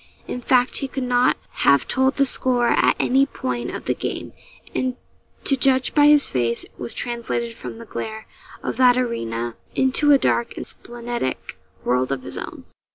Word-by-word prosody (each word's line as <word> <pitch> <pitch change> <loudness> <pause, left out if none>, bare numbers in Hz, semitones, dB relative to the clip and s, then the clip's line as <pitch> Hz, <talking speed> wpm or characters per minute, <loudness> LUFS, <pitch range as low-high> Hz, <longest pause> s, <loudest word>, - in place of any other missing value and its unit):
In 250 - -4
fact, 250 +1 +2
he 275 - -2
could 265 0 -4
not 245 0 +3 0.2
have 140 - +4
told 265 +1 +2
the 275 - +3
score 250 -2 +2
at - - +3
any 270 +2 +3
point 125 - -4
of - - -6
the - - +1
game; - - -5 0.4
and, 255 -1 -1 0.5
to 275 - +3
judge 260 0 +2
by 290 -1 +6
his 295 -1 +6
face, 120 -2 0
was 120 -1 -6
translated 235 -1 -3
from 225 - -8
the 230 - -10
glare 220 0 -6 0.4
of - - -3
that 250 -1 +5
arena 120 - -2 0.2
into 265 +3 +3
a 280 - +8
dark 235 -3 0
and - - -5
splenetic 240 - -5 0.3
world 125 +1 +1
of 135 -1 -3
his - - -6
own. - - -8
245 Hz, 175 wpm, -22 LUFS, -, 0.5 s, a